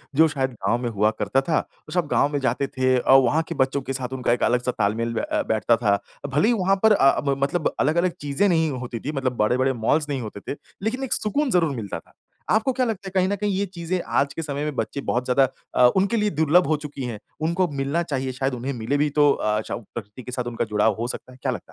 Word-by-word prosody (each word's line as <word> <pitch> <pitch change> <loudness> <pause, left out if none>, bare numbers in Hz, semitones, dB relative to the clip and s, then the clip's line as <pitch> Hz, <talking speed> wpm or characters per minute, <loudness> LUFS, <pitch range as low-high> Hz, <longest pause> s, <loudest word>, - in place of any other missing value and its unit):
जो 160 +2 +6
शायद 130 -1 0
गाँव 120 - +3
में 120 - 0
हुआ 105 0 +2
करता 105 +6 +1
था। 155 - +3 0.3
तो 155 - -8
सब 175 -5 +1
गाँव 145 - +3
में 145 - +1
जाते 140 - 0
थे 130 0 +3
और 135 +2 +6
वहाँ 160 +5 +2
के 165 - -3
बच्चों 135 +1 -2
के - - 0
साथ 130 0 -4
उनका 120 - +1
एक 125 - -1
अलग-सा 125 +1 +2
तालमेल 115 +1 -1
ब 115 - -1
अ, - - +2
बैठता 110 +2 +3
था। 100 -3 +2 0.3
भले 150 +9 +2
ही 240 - +4
वहाँ 195 -2 +2
पर 220 - +6
अ, 135 -8 +4
ब 140 -1 0
मतलब 155 +3 0
अलग-अलग 170 +5 +2
चीज़ें 145 +7 +1
नहीं 160 -2 +2
होती 125 -3 -5
थीं, 145 - -4
मतलब 130 -2 -1
बड़े-बड़े 130 +5 +2
मॉल्स 150 -1 +2
नहीं 135 -3 -2
होते 105 -2 -7
थे, - - -11 0.3
लेकिन 250 +5 -1
एक 260 - 0
सुकून 275 +7 0
ज़रूर 165 -6 +2
मिलता 105 -5 -5
था। - - -25 0.4
आपको 220 +5 +2
क्या 255 0 +1
लगता 200 -4 -3
है - - -6
कहीं 185 0 +3
न 205 - 0
कहीं 205 0 -1
ये 200 +2 0
चीज़ें 175 -1 -3 0.2
आज 140 0 0
के 165 - -4
समय 145 -1 -3
में 150 -2 -3
बच्चे 130 +4 -3
बहुत 125 +1 +1
ज़्यादा 130 +1 +4 0.3
अ, 125 - +7
उनके 200 +5 +2
लिए 210 -1 +2
दुर्लभ 160 +3 +4
हो 155 -1 +2
चुकी 140 -2 -6
हैं? 115 -4 -5 0.2
उनको 170 +3 +1
मिलना 145 +5 0
चाहिए, 135 -5 -2
शायद 135 +1 -2
उन्हें 125 +3 -3
मिले 120 +4 -1
भी 150 +1 +2
तो 145 -1 +6
अ, 105 -3 0
चउ - - -5
प्रकृति 110 +2 -8
के 125 - -8
साथ 125 0 -2
उनका 115 - -1
जुड़ाव 105 0 +2
हो 120 - -1
सकता 130 - -7
है, 130 - -15
क्या 130 - 0
लगता 90 -8 -7
140 Hz, 260 wpm, -23 LUFS, 125-170 Hz, 0.4 s, अ